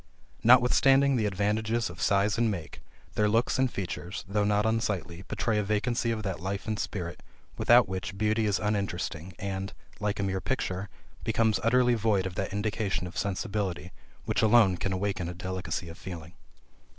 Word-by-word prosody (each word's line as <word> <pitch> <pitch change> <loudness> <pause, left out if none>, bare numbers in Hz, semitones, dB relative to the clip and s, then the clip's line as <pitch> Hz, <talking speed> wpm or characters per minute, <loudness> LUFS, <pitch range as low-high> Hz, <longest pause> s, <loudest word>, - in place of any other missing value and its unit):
Notwithstanding 135 +3 +5
the 110 -4 +1
advantages 110 +4 0
of 85 -1 -9
size 100 +1 +2
and 120 -1 +3
make, 85 -7 -5 0.3
their 105 0 +2
looks 115 +4 +1
and 130 -2 +2
features, 95 +1 -5
though 105 +2 +1
not 105 +1 +2
unsightly, 100 -6 -1
betray 105 0 0
a - - 0
vacancy 110 +4 0
of 110 -2 -2
that 95 -5 -3
life 95 +4 -4
and 110 -1 -2
spirit, 85 -4 -4 0.3
without 120 -1 +5
which 95 +1 -5
beauty 110 +1 +1
is 100 -1 +2
uninteresting, 95 -5 -2
and, 95 0 -4 0.3
like 105 -1 -1
a - - 0
mere 95 -1 -1
picture, 100 -7 -2 0.3
becomes 110 -2 +2
utterly 125 +2 +4
void 110 -4 +1
of 95 - -3
that 95 - -3
indication 105 -2 -1
of 90 - -8
sensibility, 95 -4 -2 0.3
which - - 0
alone 110 -4 +5
can 100 - -2
awaken 95 -2 -2
a 90 - -6
delicacy 90 -2 -4
of 85 +1 -10
feeling. 85 -2 -8
100 Hz, 170 wpm, -28 LUFS, 95-110 Hz, 0.3 s, Notwithstanding